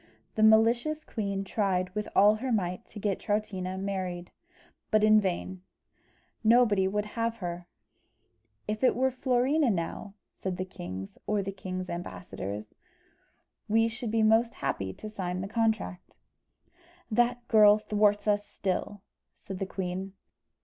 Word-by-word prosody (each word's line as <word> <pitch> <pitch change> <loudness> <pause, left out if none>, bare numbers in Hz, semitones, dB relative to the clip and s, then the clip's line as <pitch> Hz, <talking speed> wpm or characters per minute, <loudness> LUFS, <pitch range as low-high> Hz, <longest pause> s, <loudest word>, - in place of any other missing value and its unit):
The 215 - -1
malicious 235 +8 +4
queen 200 -3 -3
tried 190 -2 -1
with 210 0 -3
all 210 +2 +6
her 255 +3 -3
might 180 -5 -1
to - - -13
get 200 -2 -1
Troutina 195 -3 -2
married, 185 -3 -4 0.6
but 215 -1 +3
in 215 0 +6
vain. 185 -1 -3 0.8
Nobody 220 -4 +5
would 210 +2 -1
have 230 +2 -2
her. 175 -2 -5 1.0
"If 215 +2 -3
it 255 - +4
were 265 +1 +2
Florina, 260 +3 +2
now," 195 +2 -3 0.2
said 185 -2 -4
the 185 - -2
kings, 95 - -8
or 210 -1 +1
the 195 - -3
kings' 185 -1 -5
ambassadors, 105 - -6 0.9
"we 225 +2 +3
should 230 +1 -4
be 225 0 +2
most 225 +2 +3
happy 95 -9 -2
to 215 - -9
sign 185 -3 -4
the 195 - -4
contract." 220 -4 -1 1.0
"That 240 +1 +1
girl 210 -2 +7
thwarts 210 -1 +1
us 205 0 +2
still," 200 0 -3 0.3
said 190 -1 -8
the 195 - -2
queen. 190 0 -4
205 Hz, 140 wpm, -29 LUFS, 185-220 Hz, 1.0 s, girl